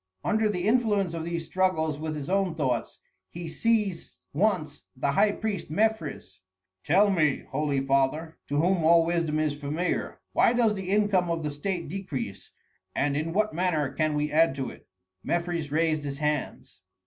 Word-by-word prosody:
Under 220 0 +2
the 180 -1 -1
influence 210 -6 +2
of 165 -1 -3
these 170 -1 -3
struggles 160 -6 0
with 155 0 -3
his 145 -2 -5
own 190 -3 +1
thoughts, 130 -7 -2 0.3
he 170 0 -7
seized 210 -1 -1
once 160 -4 0
the 135 +2 0
high 205 +9 +4
priest 205 -3 -3
Mefres. 165 - -1 0.4
"Tell 200 +6 +4
me, 155 -7 +2
holy 140 -1 0
father, 140 +4 0
to 145 - -3
whom 175 +1 +2
all 165 +1 +6
wisdom 165 -2 0
is 155 -2 +1
familiar, 150 +5 -2
why - - +4
does 235 -3 +3
the 190 -2 -5
income 200 -3 +2
of 165 -1 -1
the 150 - -2
state 170 +3 -3
decrease, 135 - -5 0.5
and 140 0 +1
in 155 +3 -1
what 215 +4 +1
manner 160 -5 0
can 155 0 0
we 150 0 -1
add 160 -3 +4
to 135 -2 -3
it?" - - -16 0.4
Mefres 170 -3 -2
raised 155 -1 +1
his 140 -1 -4
hands. 150 -9 -3
165 Hz, 170 wpm, -27 LUFS, 150-190 Hz, 0.5 s, all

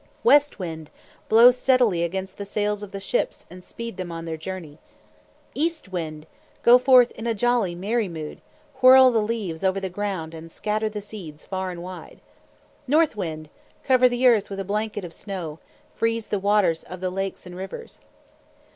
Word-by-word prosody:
"West 290 -9 +5
Wind! 160 -4 -6 0.4
Blow 235 +3 +8
steadily 250 -7 +2
against 190 +2 -4
the 200 - -5
sails 210 0 -2
of 205 -2 -8
the 195 - -5
ships 195 - -2
and 180 0 -11
speed 230 -1 -8
them 180 -2 -5
on 165 0 -6
their 165 -1 -4
journey. 160 -2 -8 0.7
"East 320 - -2
Wind! 160 -4 -5 0.4
Go 245 +1 +8
forth 250 -1 +6
in 230 - -7
a 230 - 0
jolly, 235 -5 +1
merry 210 +3 -1
mood. 155 -3 -7 0.4
Whirl 260 0 +8
the 225 -2 +2
leaves 210 -6 -3
over 190 0 +1
the 190 -1 -4
ground 185 -4 -4
and 165 0 -10
scatter 215 +3 -2
the 210 -1 -6
seeds 180 -8 -10
far 190 -1 -3
and 175 -1 -7
wide. 185 0 -10 0.7
"North 305 0 +3
Wind! 160 -6 -5 0.4
Cover 255 -1 +4
the 245 +1 -1
earth 230 -5 +4
with 195 -1 -6
a 195 - -3
blanket 210 0 -2
of 170 - -9
snow. 170 -6 -6 0.3
Freeze 230 -1 -1
the 205 - 0
waters 200 -4 +2
of 185 - -10
the 185 0 -2
lakes 195 +1 -4
and 180 0 -10
rivers." 190 - -8
195 Hz, 180 wpm, -24 LUFS, 175-230 Hz, 0.7 s, Blow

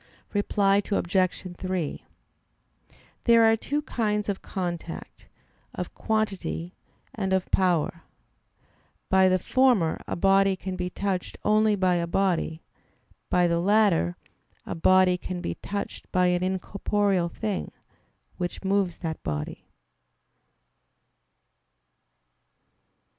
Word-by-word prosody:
Reply 205 -1 +2
Obj. 185 -1 +1
3: 185 -5 -3 1.2
There 230 -1 +6
are 225 0 +6
two 290 +6 -2
kinds 210 -6 -1
of 195 - -2
contact; 175 -3 -6 0.5
of - - -5
"quantity," 205 -5 -2 0.4
and 195 -3 -2
of 190 -1 0
"power." 170 -3 +1 1.1
By 190 0 +6
the 185 - +3
former 235 -5 +2
a - - -2
body 195 +1 +4
can 190 0 -5
be 180 0 -3
touched 190 0 -3
only 215 0 +4
by 185 -2 +2
a 170 0 -1
body; 170 -3 0 0.7
by 180 0 +3
the 170 -1 +2
latter 190 - +3 0.5
a - - -4
body 185 +1 +4
can 180 0 -5
be 85 - -3
touched 200 - -6
by 180 -1 +3
an 175 - 0
incorporeal 190 0 0
thing, 210 +1 -3 0.7
which 175 +1 -4
moves 195 -2 +1
that 160 -1 -3
body. 75 -1 -5
190 Hz, 110 wpm, -26 LUFS, 175-205 Hz, 1.2 s, There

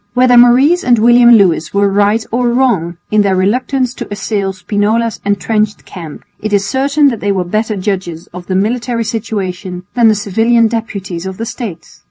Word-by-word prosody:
Whether 250 0 +4
Maurice 255 +9 +5
and 245 -1 +3
William 240 +2 +5
Lewis 185 -6 +2
were 200 0 +3
right 205 +3 +1
or 240 +1 0
wrong 230 -10 0
in 210 0 +3
their 195 -2 +1
reluctance 250 +6 0
to - - -7
assail 205 -1 -2
Spinola's 210 +4 -1
entrenched 210 +1 -1
camp, 165 -5 -10 0.2
it 215 0 -4
is 200 -1 +2
certain 280 +3 +2
that 235 -5 -4
they 205 - -1
were 190 -2 -1
better 215 +4 -2
judges 185 -4 -4
of 180 0 -9
the 185 - -2
military 230 +4 -1
situation 190 -5 -4
than 235 -2 +3
the 215 - +4
civilian 225 +3 +2
deputies 195 -6 -5
of 190 -1 -7
the 225 - -4
States. 225 -7 -8
215 Hz, 180 wpm, -13 LUFS, 195-240 Hz, 0.2 s, Maurice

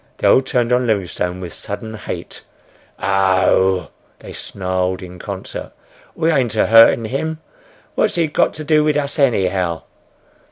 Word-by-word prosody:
They - - +1
all - - +6
turned 125 -2 0
on 125 0 +2
Livingstone 90 -4 -1
with 90 -2 -7
sudden 110 +2 -7
hate. 105 - -7 0.6
"Arr 95 -1 +2
oh 95 -1 +3
h!" - - -18 0.3
they - - -11
snarled 95 0 -3
in 90 0 -10
concert. 95 -1 -7 0.4
"We 165 0 +1
ain't 125 -7 +1
a 110 - +3
hurtin' 115 0 +6
him! 155 +7 -3 0.6
What's - - +1
he 170 -1 +2
got 150 - +1
to 155 - -6
do 150 0 +3
wid 150 -1 +1
us 140 0 -3
anyhow!" 95 - +1
110 Hz, 160 wpm, -18 LUFS, 95-135 Hz, 0.6 s, all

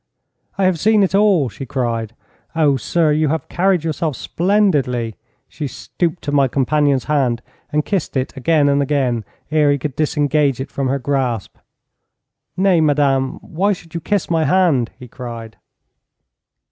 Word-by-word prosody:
'I 195 - +1
have 185 -3 +2
seen 215 +1 +4
it 190 - 0
all,' 195 -8 +4
she 115 +4 -8
cried. 115 -3 -3 0.4
'Oh, 150 -4 +3
sir, 155 +6 +1
you 155 +1 +2
have 160 +2 -2
carried 185 -2 +1
yourself 160 -2 -2
splendidly.' 145 - +1 0.3
She 150 - -5
stooped 170 +6 -3
to 145 - -3
my 140 -2 +3
companion's 140 +1 +1
hand, 130 -6 0 0.3
and 150 0 0
kissed 190 -8 -2
it 130 +3 -2
again 145 +2 +2
and 140 0 +3
again 130 -6 0 0.3
ere 150 -2 +4
he 140 - +2
could 140 0 -5
disengage 150 -3 +1
it 130 - -5
from 135 -1 -2
her 135 +2 0
grasp. 130 -5 -2 1.0
'Nay, 185 -3 +3
madame, 140 -3 +2
why 195 +5 0
should 165 -3 -12
you 170 - -4
kiss 205 +2 -1
my 165 -2 +1
hand?' 165 -11 +2
he 125 -1 -11
cried. 115 -3 -8
145 Hz, 160 wpm, -19 LUFS, 130-165 Hz, 1.0 s, seen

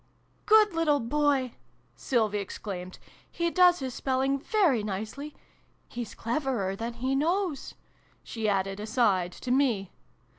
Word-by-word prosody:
" - - -39
Good 430 -2 +6
little 315 -3 +2
boy! 275 0 +1 0.2
" 120 0 -38
Sylvie 215 - 0
exclaimed. 185 -2 -6 0.2
" - - -30
He 340 0 +1
does 360 -1 +5
his 260 -4 -5
spelling 270 +1 0
very 320 - +2
nicely. 215 +9 -5 0.5
Hes 240 -3 -6
cleverer 235 -6 -2
than 230 +3 -4
he 255 +3 -1
knows! 335 +1 -1 0.2
" - - -35
she 220 -2 -2
added, 195 0 -1
aside, 210 -5 +1
to 250 - -5
me. 245 -8 +1
250 Hz, 145 wpm, -28 LUFS, 205-290 Hz, 0.5 s, Good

